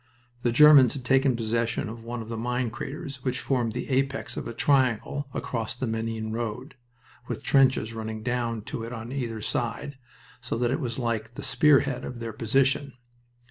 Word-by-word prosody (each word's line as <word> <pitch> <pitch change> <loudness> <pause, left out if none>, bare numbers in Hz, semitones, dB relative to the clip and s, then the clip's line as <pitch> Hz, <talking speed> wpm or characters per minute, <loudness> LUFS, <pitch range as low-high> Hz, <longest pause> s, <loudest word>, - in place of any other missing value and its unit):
The 120 - +1
Germans 145 0 +8
had 130 -3 -7
taken 135 0 +3
possession 115 0 -1
of 115 +1 -8
one 120 0 -5
of - - -12
the 115 - -4
mine 125 +1 -1
craters 140 +2 -6
which 130 -1 -1
formed 120 -5 0
the 125 - -4
apex 135 +1 0
of - - -4
a 115 - -5
triangle 135 +1 +1
across 115 -3 -3
the 130 - -3
Menin 110 -1 -3
road, 120 +5 -4 0.5
with - - -5
trenches 130 -5 +3
running 110 -1 -5
down 120 -2 -1
to 115 - -5
it 115 +2 -6
on 115 +1 -6
either 120 -5 -3
side, 120 +6 -3 0.4
so - - -3
that 120 0 +1
it 135 - 0
was 120 -6 -3
like 115 -2 -2
the - - -6
spear 140 +3 +5
head 125 - -3
of 125 - -6
their 115 -1 -5
position. 135 +5 +1
120 Hz, 185 wpm, -27 LUFS, 115-135 Hz, 0.5 s, Germans